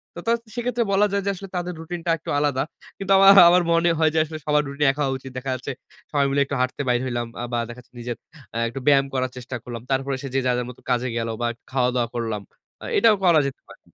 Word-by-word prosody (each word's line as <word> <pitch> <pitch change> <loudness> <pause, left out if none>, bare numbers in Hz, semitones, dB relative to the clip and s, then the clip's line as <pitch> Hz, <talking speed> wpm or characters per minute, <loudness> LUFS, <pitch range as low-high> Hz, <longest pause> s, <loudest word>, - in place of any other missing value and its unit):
তা - - -6
তা - - +4 0.2
সেক্ষেত্রে 240 0 0
বলা 200 +1 +4
যায় 200 0 0
যে - - +1
আসলে 195 +1 -9
তাদের 180 0 -3
রুটিনটা 170 +1 -3
একটু - - -10
আলাদা। 145 -3 +1 0.3
কিন্তু 195 -1 -3
আমা 195 0 +6 0.2
আমার 180 +1 +4
মনে 170 +1 +3
হয় 160 -1 +4
যে 160 - +2
আসলে 155 0 -7
সবার 150 0 +3
রুটিন 140 +1 -1
একা 145 +2 -5
হওয়া 135 -1 -1
উচিত। 130 0 -11
দেখা 130 +1 -4
যাচ্ছে 130 +2 -5 0.4
সবাই 145 -2 +2
মিলে 140 +1 +2
একটু 140 - -4
হাঁটতে 130 +2 -1
বাইর 120 -1 +2
হইলাম। 120 -2 -2
আ - - -3
বা 120 - +1
দেখাচ্ছে 120 +1 -12
নিজের 120 0 -5 0.4
আ - - -1
একটু 125 - -6
ব্যায়াম 140 -1 +5
করার 130 -1 -1
চেষ্টা 125 +1 -6
করলাম। 120 -2 -7
তারপরে 135 +1 0
এসে 135 +1 -6
যে - - +4
যার, 125 -1 +2
যার 125 0 -3
মতো 125 - -12
কাজে 125 0 +1
গেলো 115 0 -2
বা 120 - +1 0.2
খাওয়াদাওয়া 125 -2 +1
করলাম। 110 -3 -2 0.4
আ - - -6
এটাও 225 -2 +6
করা 170 -4 +6
যেতে 135 - -7
পারে। - - -15
135 Hz, 245 wpm, -23 LUFS, 125-165 Hz, 0.4 s, আমা